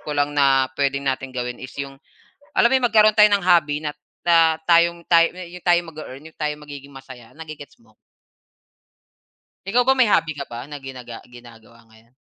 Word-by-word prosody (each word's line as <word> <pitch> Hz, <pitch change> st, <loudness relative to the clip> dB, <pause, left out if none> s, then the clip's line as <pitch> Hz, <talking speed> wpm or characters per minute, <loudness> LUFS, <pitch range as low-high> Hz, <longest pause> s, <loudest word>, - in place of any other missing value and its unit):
ko 150 Hz, -1 st, -6 dB
lang 145 Hz, 0 st, 0 dB
na 135 Hz, -2 st, +2 dB
pwedeng 140 Hz, 0 st, -2 dB
nating 130 Hz, -1 st, -3 dB
gawin 125 Hz, 0 st, -5 dB
is 130 Hz, -, -9 dB
yung, 135 Hz, -1 st, -7 dB, 0.6 s
alam 235 Hz, -, +4 dB
mo -, -, +2 dB
yung 245 Hz, -, +2 dB
magkaroon 215 Hz, -1 st, +5 dB
tayo 210 Hz, 0 st, +8 dB
ng 200 Hz, -2 st, 0 dB
hobby 155 Hz, -4 st, +2 dB
na 150 Hz, -, -3 dB, 0.3 s
na 165 Hz, -2 st, +4 dB, 0.2 s
tayong 170 Hz, 0 st, +3 dB
tayo 170 Hz, 0 st, +4 dB
yung 180 Hz, 0 st, -11 dB
tayo 175 Hz, 0 st, +5 dB
yung 165 Hz, -, -11 dB
mag-e-earn, 150 Hz, -2 st, -10 dB
yung -, -, -43 dB
tayo 150 Hz, -1 st, -1 dB
magiging 145 Hz, -2 st, -12 dB
masaya, 130 Hz, -3 st, -13 dB
nage-gets 155 Hz, -3 st, -11 dB
mo? 110 Hz, -1 st, -27 dB, 1.7 s
Ikaw 240 Hz, +5 st, +2 dB
ba, 265 Hz, +1 st, +1 dB
may 250 Hz, -, +5 dB
hobby 165 Hz, -6 st, +1 dB
ka 140 Hz, -, -5 dB
ba 120 Hz, 0 st, -8 dB
na 145 Hz, -, -7 dB
ginaga 125 Hz, -3 st, -10 dB
ginagawa 115 Hz, -1 st, -17 dB
ngayon? 115 Hz, +3 st, -24 dB
145 Hz, 190 wpm, -21 LUFS, 130-170 Hz, 1.7 s, tayo